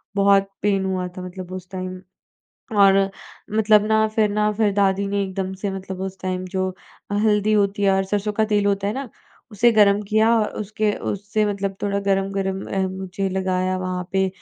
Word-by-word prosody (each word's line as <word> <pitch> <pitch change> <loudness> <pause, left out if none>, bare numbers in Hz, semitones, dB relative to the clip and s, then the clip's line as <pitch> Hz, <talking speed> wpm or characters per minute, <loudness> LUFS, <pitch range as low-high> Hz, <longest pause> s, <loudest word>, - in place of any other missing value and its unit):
बहुत 195 0 +4
पेन 195 -1 +1
हुआ 185 -1 -1
था - - -5
मतलब 180 0 -8
उस 185 0 -8
टाइम 185 0 -5 0.8
और 195 0 +5 0.5
मतलब 210 -1 +5
ना 220 0 +3
फिर 215 -2 +3
ना 210 0 +1
फिर 210 -1 +2
दादी 200 0 +2
ने 200 0 0
एकदम 190 0 -4
से 200 - 0
मतलब 190 -1 -6
उस 190 0 -5
टाइम 185 0 -3
जो 185 0 -1 0.4
हल्दी 210 0 +2
होती 200 0 +1
है 195 - +4
और 195 0 +2
सरसों 205 +1 -1
का 215 +1 +2
तेल 205 -1 +1
होता 200 0 +1
है 210 - -1
ना, 270 -3 -5 0.4
उसे 235 +3 +4
गर्म 205 -1 +4
किया 220 +1 +4
और 210 - 0
उसके 215 0 -1 0.2
उससे 205 +2 -1
मतलब 200 -1 -2
थोड़ा 200 0 0
गर्म-गर्म 195 -1 -1
म 190 -1 0
मुझे 190 +1 -3
लगाया 185 0 0
वहाँ 185 0 -3
पे 190 0 +2
195 Hz, 185 wpm, -22 LUFS, 190-210 Hz, 0.8 s, और